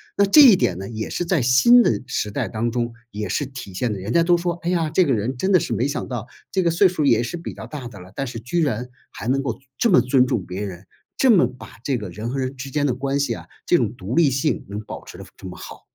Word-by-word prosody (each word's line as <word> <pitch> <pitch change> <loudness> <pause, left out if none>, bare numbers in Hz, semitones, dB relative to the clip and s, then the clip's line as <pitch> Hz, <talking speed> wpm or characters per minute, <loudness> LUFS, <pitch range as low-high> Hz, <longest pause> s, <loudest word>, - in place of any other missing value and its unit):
那 200 - +4
这 300 +10 +8
一 250 -8 +9
点 90 - 0
呢， 95 +1 -6
也 110 -1 -5
是 175 - -2
在 170 -4 +1
新 130 - +6
的 - - +1
时 120 -4 -2
代 105 - -2
当 115 +1 -2
中 120 0 -2 0.2
也 105 -2 -5
是 135 +8 -1
体 130 -8 -9
现 115 +5 -1
得 100 - -4
人 100 +5 -4
家 170 - +5
都 175 +1 +4
说： 175 0 -1
“哎 170 - -2
呀， 165 -4 0
这 180 +3 +3
个 135 - +2
人 120 +4 -2
真 190 +9 0
的 185 - +6
是 - - -3
没 120 +6 0
想 140 - -3
到， 120 -3 -5 0.2
这 190 - +1
个 170 - +2
岁 175 +4 +4
数 180 -3 -3
儿 - - +2
也 115 -2 +4
是 120 - -4
比 170 - -6
较 - - -8
大 140 -5 -7
的 105 -5 -11
了， 90 +2 -13
但 135 - -3
是 120 -2 -6
居 145 +10 -1
然 125 -4 -1 0.2
还 - - -8
能 135 +2 +2
够 135 - -2
尊 135 - -21
这 235 - +3
么 180 - +6
尊 130 0 +3
重 100 -7 -1
别 90 +3 -6
人， 95 -1 -8 0.3
这 265 - +5
么 175 - +5
把 125 -2 -13
这 135 -2 0
个 105 -4 -6
人 105 +6 -5
和 135 - -3
人 130 0 -2
之 135 +1 -7
间 145 +2 0
的 135 - +1
关 135 +2 -2
系 140 - 0
啊， - - -9 0.2
这 - - +3
种 - - -1
独 95 +6 -6
立 160 -1 +4
性， 135 +4 -1
能 100 +1 -5
保 - - -9
持 - - -12
得 - - -9
非 - - -17
这 - - -10
么 90 - -9
好。” - - -10
130 Hz, 325 characters per minute, -22 LUFS, 110-165 Hz, 0.3 s, 一